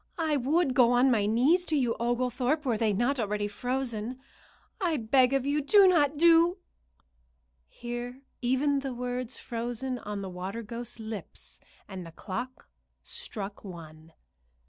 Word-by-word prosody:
I 320 -3 +1
would 285 +2 +2
go 245 -2 +5
on 255 +2 +4
my 210 -4 +2
knees 265 - +3
to 315 - -1
you, 250 -5 +1
Oglethorpe, 250 +5 0
were 245 -4 +1
they 220 0 +1
not 240 +7 +1
already 210 -1 -1
frozen. 245 +1 -3 0.6
I 340 -5 +1
beg 250 +2 +3
of 270 -1 +1
you 290 +2 +1
do 390 +7 +6
not 300 -5 +3
doo 335 +3 +5 0.6
" - - -42
Here 240 +2 -7 0.2
even 270 +3 +2
the 270 -2 -4
words 250 0 -4
froze 235 +1 -4
on 235 -6 -4
the - - -4
water 190 +5 -5
ghost's 235 +2 -7
lips 220 -2 -8 0.3
and 190 -2 -7
the 165 - -10
clock 240 +9 -6 0.4
struck 200 -1 -6
one. 160 -4 -11
245 Hz, 150 wpm, -29 LUFS, 210-275 Hz, 0.6 s, do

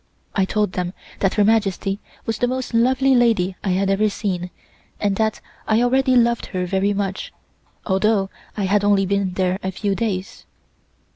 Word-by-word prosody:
I 195 - +2
told 210 0 0
them 180 0 -3 0.3
that 195 - +1
Her 210 - +4
Majesty 200 -2 +1 0.3
was 225 -1 -2
the 245 - +2
most 255 0 -3
lovely 260 +3 +3
lady 225 -7 +3
I 195 - -1
had 195 +2 +1
ever 210 +2 +2
seen, 185 -4 -3 0.5
and 200 -1 +1
that 220 -1 0 0.3
I 220 +2 +3
already 260 +1 +3
loved 235 -1 +2
her 185 -1 -2
very 190 +2 +1
much, 195 -1 -3 0.5
although 195 0 +1 0.3
I 205 - -1
had 200 +2 +2
only 200 -1 +3
been 195 -1 0
there 185 0 0
a 190 - -2
few 200 +2 -1
days. 200 -1 -3
205 Hz, 170 wpm, -21 LUFS, 190-225 Hz, 0.5 s, Her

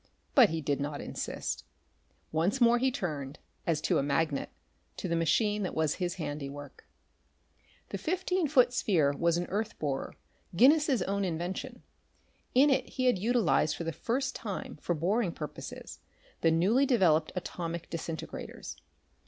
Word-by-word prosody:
But 250 -8 +7
he 160 0 -2
did 145 -1 -1
not 145 0 -3
insist. - - -4 0.7
Once 170 +11 +1
more 240 0 +5
he 265 +2 +3
turned, 150 - -4 0.3
as 165 -3 +2
to - - +2
a - - +2
magnet, 145 +1 0 0.5
to - - -3
the 170 - 0
machine 205 +6 +2
that 185 - -3
was 160 -2 +1
his 175 0 -1
handiwork. 145 - -6 1.0
The 195 - -4
fifteen 365 - 0
foot 250 -4 +4
sphere 165 - +2
was 170 +2 +2
an 175 - -1
earth 215 +3 -2
borer 140 -3 -3 0.4
Guinness's 270 - +5
own 200 +1 -1
invention. 175 +1 -4 0.7
In 280 +3 +6
it 270 - +1
he 255 - -2
had 245 -7 +3
utilized 225 -7 +2
for - - -5
the 165 - -2
first 255 - -1
time 200 -7 -5
for 175 +3 -2
boring 185 +5 +1
purposes 150 -2 -8 0.4
the 165 - +4
newly 200 +12 +3
developed 170 - +3
atomic 170 -2 -4
disintegrators. 165 -1 -6
180 Hz, 150 wpm, -30 LUFS, 160-240 Hz, 1.0 s, But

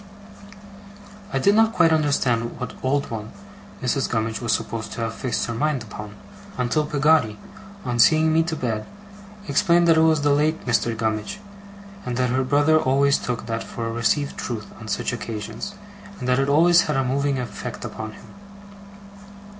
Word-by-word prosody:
I - - 0
did 200 +10 +4
not 225 +1 +4
quite 165 -2 +4
understand 135 -6 +1
what 125 - -5
old 140 +1 0
one 110 -1 -5 0.5
Mrs. 130 +1 0
Gummidge 110 0 -1
was 120 -2 0
supposed 110 0 -2
to - - -5
have 115 0 -2
fixed 125 +1 -2
her 120 - -4
mind 140 +1 0
upon, 105 0 -9 0.4
until 140 +5 0
Peggotty, 150 -7 +2 0.5
on 120 -1 -2
seeing 155 +4 +5
me 160 - +4
to 165 0 -2
bed, 110 -6 -3 0.6
explained 175 -3 +3
that 165 -1 +5
it - - +5
was 160 -2 +4
the 145 - +3
late 150 +3 +1
Mr. 120 -1 +1
Gummidge; 110 - -2 0.6
and 125 -1 -3
that 125 -1 +1
her 130 +1 +1
brother 145 +4 +3
always 140 -1 +3
took 125 -3 -4
that 115 0 -3
for 115 - -6
a 115 - -2
received 130 +5 0
truth 110 -4 -4
on 110 - -9
such 105 - -2
occasions, 115 - -6 0.4
and 125 - -5
that 125 +1 +3
it 135 +1 +1
always 170 +4 +6
had 150 - +1
a 135 - +2
moving 140 +2 0
effect 125 -2 -6
upon 110 0 -6
him. - - -14
130 Hz, 175 wpm, -23 LUFS, 115-150 Hz, 0.6 s, always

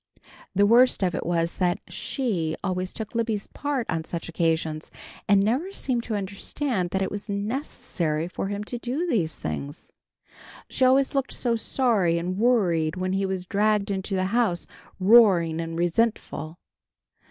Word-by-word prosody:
The 200 +2 +5
worst 240 0 +5
of 180 -2 +1
it - - -3
was, 170 -1 0
that 175 -1 +1
She 180 - -2
always 185 -1 -2
took 220 -2 -7
Libby's 225 -3 -1
part 285 -5 -3
on 165 0 -1
such 165 0 -5
occasions, 160 -2 -1 0.4
and 200 -1 +5
never 265 - 0
seemed 255 -10 -1
to 220 - -2
understand 200 +1 -2
that 190 +2 0
it - - -3
was 205 +1 -6
necessary 200 - -2
for 185 - -4
him 205 +1 -3
to 240 +3 -5
do 260 +9 -2
these 175 - 0
things. 140 - -6 0.8
She 260 - +2
always 265 +2 +4
looked 275 -1 -1
so 240 -2 0
sorry 220 -8 +1
and 180 +3 -3
worried 180 -10 +2
when 185 0 -2
he 195 0 0
was 190 -1 -3
dragged 205 +1 +1
into 195 0 -2
the 185 0 +1
house, 225 -8 +1 0.3
roaring 185 -6 +5
and 165 0 -5
resentful. 175 -2 -1
195 Hz, 160 wpm, -25 LUFS, 175-235 Hz, 0.8 s, The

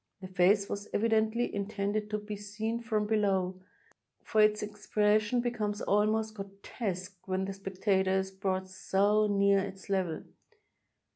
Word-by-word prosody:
The 190 - -8
face 195 +2 +3
was 205 +1 -5
e\adently 220 +2 +2
intended 205 +1 -2
to 210 - -1
be 210 0 -6
seen 210 +3 -3
from 220 -2 0
below, 190 -4 +1 0.6
for 215 - +2
its 210 0 +4
expres 210 0 +2
sion 240 +3 0
becomes 215 -4 -2
almost 215 +2 +1
grotesque 195 -1 -6
when 190 0 0
the 195 - -4
spectator 190 0 0
is 190 0 -2
brought 190 -1 -2
so 200 +3 +2
near 200 -1 +4
its 195 0 -6
level. 185 -5 -1
205 Hz, 140 wpm, -31 LUFS, 190-215 Hz, 0.6 s, its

